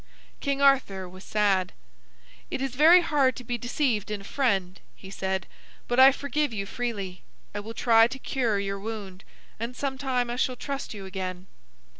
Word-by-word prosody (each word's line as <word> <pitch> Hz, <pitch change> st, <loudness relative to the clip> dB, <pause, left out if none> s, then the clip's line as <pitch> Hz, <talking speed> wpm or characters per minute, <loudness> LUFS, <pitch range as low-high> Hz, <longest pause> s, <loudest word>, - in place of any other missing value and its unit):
King 280 Hz, -1 st, -1 dB
Arthur 230 Hz, -9 st, +3 dB
was 185 Hz, +2 st, -12 dB
sad. 195 Hz, -3 st, +1 dB, 0.8 s
"It -, -, -3 dB
is 270 Hz, -1 st, -2 dB
very 325 Hz, +7 st, +7 dB
hard 280 Hz, -6 st, +2 dB
to 250 Hz, -, -8 dB
be 240 Hz, 0 st, -3 dB
deceived 245 Hz, -4 st, -1 dB
in 210 Hz, -1 st, -3 dB
a -, -, -12 dB
friend," 195 Hz, -7 st, 0 dB, 0.2 s
he 190 Hz, -, -12 dB
said, 190 Hz, -2 st, -2 dB, 0.4 s
"but 245 Hz, +1 st, +1 dB
I 265 Hz, +1 st, +10 dB
forgive 285 Hz, +1 st, -1 dB
you 200 Hz, -3 st, -3 dB
freely. 200 Hz, -5 st, -4 dB, 0.3 s
I 205 Hz, -, -3 dB
will 225 Hz, +2 st, -8 dB
try 225 Hz, -1 st, +5 dB
to 260 Hz, -, -7 dB
cure 245 Hz, -5 st, 0 dB
your 200 Hz, 0 st, -2 dB
wound, 200 Hz, -3 st, -7 dB, 0.4 s
and 235 Hz, +2 st, -4 dB
sometime 260 Hz, -3 st, -1 dB
I 240 Hz, -, -3 dB
shall 255 Hz, 0 st, 0 dB
trust 275 Hz, -2 st, -5 dB
you 195 Hz, -2 st, -7 dB
again." 185 Hz, -1 st, -5 dB
230 Hz, 175 wpm, -27 LUFS, 195-265 Hz, 0.8 s, I